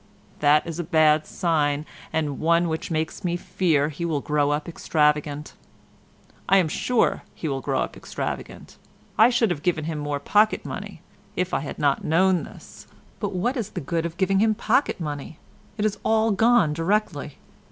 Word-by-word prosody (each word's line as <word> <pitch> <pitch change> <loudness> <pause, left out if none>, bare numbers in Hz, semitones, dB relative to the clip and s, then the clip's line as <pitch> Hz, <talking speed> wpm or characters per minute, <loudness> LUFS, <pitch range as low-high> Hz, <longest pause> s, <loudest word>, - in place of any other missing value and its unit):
That 150 +1 +4
is 165 0 -5
a - - -1
bad 155 -2 +3
sign 150 -3 0 0.3
and 150 -4 -1
one 170 +2 +3
which 160 0 -3
makes 160 +3 -2
me 175 -1 0
fear 155 -5 +1
he 155 +2 -6
will 160 -4 0
grow 145 0 +1
up 145 +1 -1
extravagant. 150 -2 0 1.0
I 195 - +6
am 185 -4 +3
sure 235 +9 +1
he 160 - -4
will 135 -2 -2
grow - - 0
up - - -4
extravagant. - - -6 0.4
I 220 +3 +6
should 235 -5 +2
have 150 -4 -3
given 160 -2 0
him 160 -2 -3
more 145 -1 -2
pocket 210 +8 +2
money - - -7 0.3
if 180 0 -2
I - - +2
had 140 0 -6
not 140 -2 +1
known 180 0 +2
this—but - - -10
what 215 +9 0
is 230 -7 -3
the - - -5
good 165 +2 -2
of 170 +1 -11
giving 195 +1 +2
him 220 +1 +3
pocket 240 +4 +1
money? 150 -1 -5 0.4
It 210 - 0
is 215 -1 -1
all 220 0 +2
gone 220 -6 +4
directly. 165 -4 -1
165 Hz, 175 wpm, -24 LUFS, 150-190 Hz, 1.0 s, I